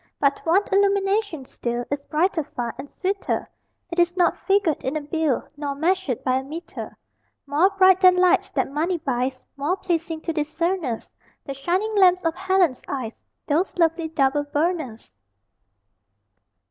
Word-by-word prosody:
But 280 -1 +2
one 355 +5 +4
illumination 395 -5 +1
still 240 -1 -4
Is 285 0 -1
brighter 325 +1 +1
far, 240 -5 -5
and 285 - -7
sweeter; 390 +1 -2 0.4
It 340 - -2
is 345 +1 +2
not 350 -1 +2
figured 390 -6 +2
in 270 +4 -1
a - - -3
bill, 300 -2 -1
Nor 285 -1 -4
measured 330 -4 0
by 255 -1 +2
a 265 - -3
meter. 315 +6 -8 0.5
More 295 +7 +3
bright 380 -1 +5
than 365 -1 +7
lights 360 0 +3
that - - -1
money 330 +5 0
buys, 260 -4 -2
More 295 +7 -1
pleasing 330 -4 -2
to 330 - -3
discerners, 310 -3 -2 0.3
The 275 - -4
shining 365 +10 -1
lamps 365 -2 +5
of 325 - +2
Helen's 375 -6 +1
eyes, 250 -5 -4 0.3
Those 320 +6 +2
lovely 330 -1 +2
double 290 -2 +1
burners! 290 - -2
325 Hz, 150 wpm, -23 LUFS, 280-370 Hz, 0.5 s, than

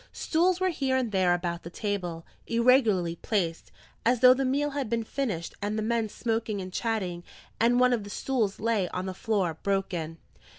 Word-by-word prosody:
Stools 350 +3 +1
were 375 0 +2
here 270 -6 0
and 245 -4 -1
there 185 -3 +3
about 175 -1 -1
the 170 - -8
table, 180 -4 -3 0.2
irregularly 230 -8 +3
placed, 170 -6 -2 0.3
as 240 +1 +3
though 255 0 +9
the 270 +1 -1
meal 285 +3 0
had 275 -5 -3
been 230 0 0
finished 220 -9 -3
and 210 +1 -2
the 215 - -1
men 225 -1 0
smoking 225 -2 -2
and 185 -1 -7
chatting; 190 -7 -2 0.4
and 240 +2 +4
one 250 0 +5
of 225 -4 -1
the 205 - -9
stools 220 -3 -1
lay 215 -5 0
on 180 +1 -4
the 190 - -4
floor, 185 -5 -1
broken. 180 -5 -2
215 Hz, 185 wpm, -28 LUFS, 185-250 Hz, 0.4 s, though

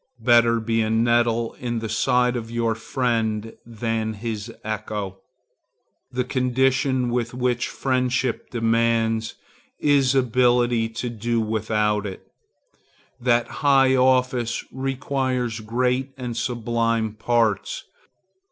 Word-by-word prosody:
Better 115 -1 +5
be 115 0 0
a 110 - 0
nettle 115 0 +2
in 120 -1 -3
the 110 0 -3
side 125 +2 +2
of 115 -2 -4
your 115 -1 0
friend 115 -2 -1
than 115 -1 -2
his 110 +1 -5
echo. 105 -3 -4 0.9
The 125 0 -1
condition 130 0 +1
which 120 0 -2
high 125 -1 0
friendship 130 -1 -1
demands 115 -1 +1 0.4
is 140 -3 +3
ability 120 -2 +2
to 115 +2 -4
do 115 +1 -1
without 105 -1 0
it. 95 - -9 0.9
That 120 -1 +2
high 135 -2 +5
office 125 -2 +2
requires 130 -3 -2
great 125 +4 -1
and 125 -2 -5
sublime 115 -2 -1
parts. 110 -2 0
120 Hz, 105 wpm, -23 LUFS, 115-125 Hz, 0.9 s, Better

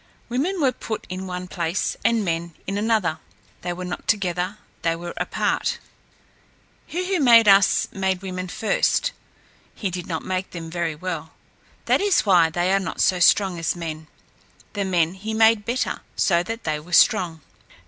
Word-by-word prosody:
Women 310 +11 -1
were 275 -4 +3
put 220 -3 -6
in 185 +1 -5
one 180 0 -5
place 170 +2 -2
and 230 -3 +2
men 170 -1 -2
in 195 - -3
another. 210 -8 +1 0.4
They 175 - -3
were 180 +1 -5
not 180 - -6
together; 185 -1 0 0.2
they 165 -1 +1
were 175 +1 -7
apart. - - -1 1.1
He 365 +3 -3
who 360 - +1
made 230 -3 +7
us 195 -1 +5
made 190 -1 -1
women 185 -1 -4
first. 225 - +1 0.6
He 195 -4 -3
did 180 0 -5
not 160 -3 -4
make 185 0 -2
them 165 -2 -8
very 170 -2 -2
well. 160 -1 -5 0.5
That - - +3
is 405 -3 +3
why 175 -5 +5
they 175 +3 0
are 195 - +4
not 175 -4 -5
so 185 - +3
strong 185 0 +4
as 165 - -1
men. 160 -2 -6 0.7
The 200 -2 -2
men 175 -3 +1
he 215 +3 -5
made 220 -1 +4
better; 245 +3 -1
so 170 -3 +3
that 225 +6 -5
they 155 -1 -1
were 170 +3 -12
strong. 175 -5 +4
185 Hz, 170 wpm, -23 LUFS, 170-215 Hz, 1.1 s, made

